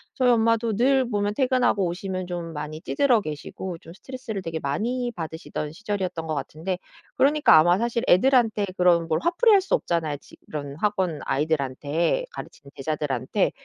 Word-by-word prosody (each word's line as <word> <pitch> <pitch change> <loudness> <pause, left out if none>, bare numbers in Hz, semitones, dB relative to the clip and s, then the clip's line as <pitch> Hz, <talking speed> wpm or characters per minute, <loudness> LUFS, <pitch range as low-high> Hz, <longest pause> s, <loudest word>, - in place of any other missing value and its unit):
저희 255 -1 +3
엄마도 230 -1 +2
늘 260 +2 +3
보면 205 -2 0
퇴근하고 255 -5 +2
오시면 185 +1 -4
좀 175 -2 -5
많이 155 +1 -6
찌들어 260 -6 +2
계시고 170 +2 -6
좀 165 0 -13
스트레스를 240 -1 -7
되게 165 -2 -4
많이 235 - -1
받으시던 160 -2 -5
시절이었던 185 -3 -4
것 155 - -1
같은데 160 +6 -4 0.4
그러니까 290 - +5
아마 175 +3 +5
사실 235 +2 -1
애들한테 225 0 +4
그런 175 -2 +4
뭘 160 -1 0
화풀이할 395 +4 +4
수 385 - +1
없잖아요 160 -4 -1
지 - - -18 0.2
그런 145 -2 -5
학원 185 -3 -1
아이들한테 150 - 0
가르치는 140 - -10
제자들한테. 145 - -1
180 Hz, 395 characters per minute, -24 LUFS, 155-235 Hz, 0.4 s, 그러니까